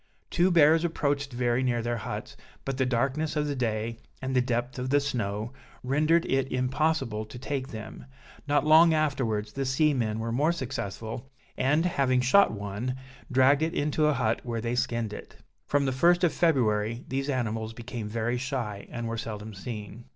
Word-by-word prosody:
Two 175 Hz, +2 st, +3 dB
bears 165 Hz, -1 st, +5 dB
approached 145 Hz, -4 st, -1 dB
very 120 Hz, 0 st, +1 dB
near 120 Hz, -3 st, 0 dB
their 120 Hz, 0 st, -1 dB
huts, 105 Hz, -, -6 dB, 0.3 s
but 135 Hz, -1 st, -2 dB
the 130 Hz, -, +2 dB
darkness 135 Hz, +6 st, 0 dB
of 150 Hz, -1 st, +1 dB
the 145 Hz, -1 st, -2 dB
day, 115 Hz, -2 st, -2 dB, 0.2 s
and 130 Hz, 0 st, -3 dB
the 125 Hz, -, +5 dB
depth 125 Hz, +1 st, -2 dB
of 130 Hz, +1 st, -3 dB
the 145 Hz, +1 st, +4 dB
snow, 115 Hz, -4 st, -3 dB, 0.3 s
rendered 155 Hz, +6 st, +2 dB
it 135 Hz, -1 st, 0 dB
impossible 130 Hz, -3 st, 0 dB
to 110 Hz, +3 st, -10 dB
take 130 Hz, +1 st, -3 dB
them; 110 Hz, -1 st, -8 dB, 0.4 s
not 145 Hz, +1 st, +2 dB
long 160 Hz, +1 st, +7 dB
afterwards 115 Hz, -9 st, 0 dB
the 135 Hz, -, -2 dB
seamen 130 Hz, -5 st, +1 dB
were 115 Hz, +1 st, -3 dB
more 145 Hz, +8 st, +2 dB
successful, 115 Hz, -, -5 dB, 0.3 s
and, 150 Hz, +6 st, +2 dB
having 135 Hz, -7 st, +2 dB
shot 165 Hz, +11 st, +5 dB
one, 105 Hz, +4 st, -4 dB, 0.4 s
dragged 130 Hz, +3 st, +5 dB
it 160 Hz, +2 st, 0 dB
into 150 Hz, +1 st, +1 dB
a 150 Hz, -, +3 dB
hut, 115 Hz, -4 st, 0 dB
where 115 Hz, -2 st, -3 dB
they 115 Hz, +1 st, -2 dB
skinned 115 Hz, -3 st, -1 dB
it. -, -, -10 dB, 0.3 s
From 145 Hz, -1 st, +2 dB
the 135 Hz, -, +1 dB
1st 175 Hz, +7 st, +3 dB
of 175 Hz, -, +3 dB
February 115 Hz, -7 st, +1 dB
these 135 Hz, +2 st, -2 dB
animals 115 Hz, -4 st, -1 dB
became 115 Hz, -1 st, -6 dB
very 115 Hz, +2 st, -1 dB
shy, 120 Hz, -6 st, -4 dB
and 120 Hz, -1 st, -4 dB
were 115 Hz, 0 st, -3 dB
seldom 110 Hz, -1 st, -6 dB
seen. 105 Hz, +2 st, -7 dB
125 Hz, 180 wpm, -28 LUFS, 115-145 Hz, 0.4 s, long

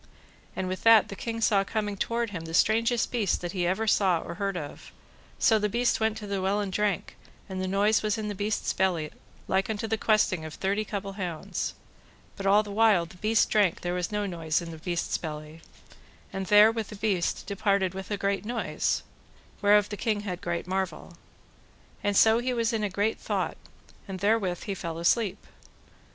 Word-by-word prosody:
And 185 Hz, -, -2 dB
with 185 Hz, 0 st, -4 dB
that 225 Hz, -2 st, +6 dB
the 200 Hz, -, -6 dB
king 230 Hz, +2 st, -4 dB
saw 200 Hz, -3 st, +3 dB
coming 210 Hz, 0 st, -2 dB
toward 230 Hz, +2 st, -1 dB
him 165 Hz, -4 st, -5 dB
the 165 Hz, 0 st, -4 dB
strangest 230 Hz, +4 st, +2 dB
beast 220 Hz, -7 st, 0 dB
that 175 Hz, -1 st, -4 dB
ever 185 Hz, +4 st, 0 dB
he -, -, -3 dB
saw 190 Hz, -5 st, +3 dB
or -, -, -6 dB
heard 195 Hz, +1 st, -2 dB
of; 145 Hz, -3 st, -8 dB, 0.5 s
so 220 Hz, -1 st, +4 dB
the 210 Hz, 0 st, 0 dB
beast 240 Hz, +3 st, +1 dB
went 220 Hz, 0 st, +1 dB
to 215 Hz, -, -7 dB
the 200 Hz, -1 st, -2 dB
well 195 Hz, +2 st, +1 dB
and 200 Hz, -2 st, -3 dB
drank, 210 Hz, -1 st, -1 dB, 0.3 s
and 190 Hz, -1 st, -4 dB
the 185 Hz, -, -2 dB
noise 205 Hz, +3 st, +3 dB
was 215 Hz, 0 st, 0 dB
in 215 Hz, -1 st, -3 dB
the 205 Hz, -, -3 dB
beast's 205 Hz, +2 st, -1 dB
belly 175 Hz, -5 st, 0 dB, 0.4 s
like 190 Hz, +2 st, +1 dB
unto 220 Hz, 0 st, -2 dB
the 225 Hz, 0 st, -1 dB
questing 210 Hz, -7 st, +2 dB
of 155 Hz, -1 st, -7 dB
thirty 200 Hz, +3 st, 0 dB
couple 200 Hz, -2 st, -5 dB
hounds; 180 Hz, +2 st, -3 dB, 0.6 s
but 195 Hz, -, -3 dB
all 205 Hz, +2 st, +5 dB
the 205 Hz, -, -8 dB
while 210 Hz, -4 st, +4 dB
the 175 Hz, +2 st, -15 dB
beast 215 Hz, +3 st, +2 dB
drank 200 Hz, -5 st, +2 dB
there 175 Hz, 0 st, -2 dB
was 180 Hz, 0 st, -2 dB
no 210 Hz, 0 st, -1 dB
noise 165 Hz, -4 st, -1 dB
in 170 Hz, -1 st, -7 dB
the 160 Hz, -, -9 dB
beast's 175 Hz, 0 st, -2 dB
belly: 155 Hz, 0 st, -7 dB, 0.7 s
and 190 Hz, 0 st, -3 dB
there 210 Hz, +1 st, +7 dB
with 225 Hz, -2 st, -3 dB
the -, -, -9 dB
beast 200 Hz, -4 st, -1 dB
departed 200 Hz, -2 st, 0 dB
with 190 Hz, 0 st, -7 dB
a 205 Hz, -, -1 dB
great 200 Hz, 0 st, -1 dB
noise, 235 Hz, +2 st, -1 dB, 0.6 s
whereof 205 Hz, 0 st, +5 dB
the 205 Hz, -, -5 dB
king 215 Hz, -2 st, 0 dB
had 185 Hz, -4 st, -5 dB
great 170 Hz, -1 st, -2 dB
marvel. 190 Hz, +1 st, -3 dB, 0.9 s
And 205 Hz, -1 st, +1 dB
so 225 Hz, +1 st, +6 dB
he 250 Hz, +1 st, -1 dB
was 230 Hz, 0 st, 0 dB
in 220 Hz, -1 st, 0 dB
a 205 Hz, -, 0 dB
great 205 Hz, +3 st, -1 dB
thought, -, -, -2 dB, 0.5 s
and 190 Hz, -1 st, -5 dB
therewith 200 Hz, -4 st, +1 dB
he 200 Hz, -, -3 dB
fell 170 Hz, -4 st, -5 dB
asleep. 190 Hz, +4 st, +1 dB
200 Hz, 200 wpm, -27 LUFS, 185-215 Hz, 0.9 s, there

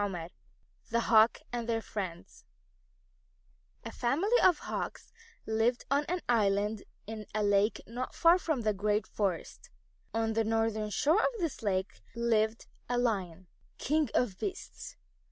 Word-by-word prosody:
XIII 175 Hz, -5 st, -4 dB, 0.6 s
THE 235 Hz, -, +2 dB
HAWKS 225 Hz, 0 st, +4 dB
AND 235 Hz, -1 st, -3 dB
THEIR 225 Hz, -1 st, 0 dB
FRIENDS 185 Hz, -5 st, -6 dB, 1.4 s
A -, -, -5 dB
family 345 Hz, -, +1 dB
of 355 Hz, -4 st, +5 dB
Hawks -, -, -5 dB, 0.3 s
lived 225 Hz, +3 st, +1 dB
on 285 Hz, +1 st, +2 dB
an 360 Hz, +2 st, -2 dB
island 210 Hz, -2 st, +2 dB, 0.2 s
in 215 Hz, -1 st, -7 dB
a 215 Hz, -, +1 dB
lake 205 Hz, +1 st, +2 dB
not 245 Hz, +3 st, -5 dB
far 340 Hz, +2 st, +5 dB
from 315 Hz, -8 st, -1 dB
the 215 Hz, -1 st, +1 dB
great 210 Hz, +2 st, 0 dB
forest. 195 Hz, -5 st, -3 dB, 0.4 s
On 225 Hz, 0 st, 0 dB
the 225 Hz, 0 st, +2 dB
northern 220 Hz, -1 st, 0 dB
shore 310 Hz, -, +3 dB
of 470 Hz, -1 st, 0 dB
this 330 Hz, -5 st, -2 dB
lake 190 Hz, -3 st, -2 dB
lived 225 Hz, -1 st, +1 dB, 0.2 s
a 245 Hz, -, +1 dB
Lion, 190 Hz, -7 st, -1 dB, 0.3 s
King 300 Hz, -1 st, +1 dB
of 210 Hz, -7 st, +1 dB
Beasts. 385 Hz, 0 st, -6 dB
225 Hz, 140 wpm, -31 LUFS, 210-250 Hz, 1.4 s, of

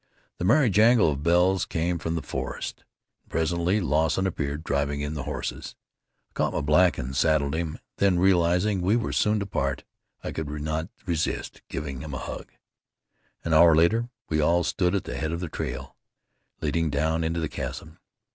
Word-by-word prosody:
The -, -, -1 dB
merry 125 Hz, +3 st, +4 dB
jangle 110 Hz, -3 st, +5 dB
of 70 Hz, -1 st, -4 dB
bells 90 Hz, +4 st, +3 dB
came 85 Hz, +1 st, -1 dB
from 80 Hz, +2 st, -2 dB
the 80 Hz, -, -3 dB
forest, -, -, -5 dB, 0.4 s
and -, -, -32 dB
presently 85 Hz, +4 st, +1 dB
Lawson 80 Hz, +1 st, +1 dB
appeared 75 Hz, -4 st, -3 dB
driving 70 Hz, -1 st, -1 dB
in 75 Hz, +1 st, -3 dB
the 70 Hz, -4 st, -5 dB
horses. 75 Hz, -, -5 dB, 0.6 s
I -, -, -38 dB
caught -, -, 0 dB
my -, -, -1 dB
black 75 Hz, +3 st, +4 dB
and 65 Hz, +2 st, -4 dB
saddled 70 Hz, 0 st, +2 dB
him, 80 Hz, -1 st, -2 dB, 0.2 s
then 95 Hz, -3 st, +3 dB
realizing 90 Hz, +2 st, +3 dB
we 95 Hz, +5 st, +2 dB
were 120 Hz, -, -1 dB
soon 105 Hz, 0 st, +2 dB
to -, -, -2 dB
part 70 Hz, -8 st, -2 dB, 0.4 s
I -, -, -4 dB
could 80 Hz, -2 st, -4 dB
not 80 Hz, +3 st, -3 dB, 0.2 s
resist 85 Hz, -3 st, -2 dB
giving 70 Hz, -2 st, -5 dB
him 75 Hz, -3 st, -6 dB
a -, -, -2 dB
hug. -, -, -7 dB, 0.9 s
An 85 Hz, -, -1 dB
hour 80 Hz, 0 st, +7 dB
later 110 Hz, +9 st, +3 dB, 0.2 s
we 75 Hz, -1 st, +1 dB
all 85 Hz, +3 st, +3 dB
stood 90 Hz, +3 st, +1 dB
at 100 Hz, -, 0 dB
the -, -, -5 dB
head 80 Hz, 0 st, -2 dB
of 85 Hz, -, -3 dB
the 90 Hz, -2 st, -4 dB
trail -, -, -5 dB, 0.7 s
leading 80 Hz, +1 st, 0 dB
down 80 Hz, +3 st, 0 dB
into 80 Hz, +1 st, -1 dB
the 80 Hz, -, -1 dB
chasm. -, -, -6 dB
80 Hz, 185 wpm, -26 LUFS, 75-90 Hz, 0.9 s, hour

